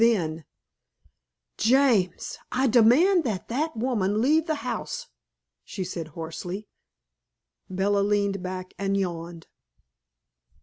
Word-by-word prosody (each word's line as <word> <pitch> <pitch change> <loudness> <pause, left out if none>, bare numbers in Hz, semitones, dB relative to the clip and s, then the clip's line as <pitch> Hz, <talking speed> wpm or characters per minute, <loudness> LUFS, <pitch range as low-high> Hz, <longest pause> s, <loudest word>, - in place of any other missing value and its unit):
Then 165 -9 +1 1.1
"James, 230 -7 +2
I 260 +1 +1
demand 265 - +5
that 205 -7 -3
that 300 +4 -1
woman 215 -4 0
leave 310 +7 +3
the 310 - +1
house!" 220 -12 -4 0.6
she 185 - -5
said 175 -3 -5
hoarsely. 175 +5 -5 1.0
Bella 195 +2 +1
leaned 200 -1 +1
back 185 0 -6
and 195 0 0
yawned. 170 -3 -4
200 Hz, 100 wpm, -26 LUFS, 180-245 Hz, 1.1 s, demand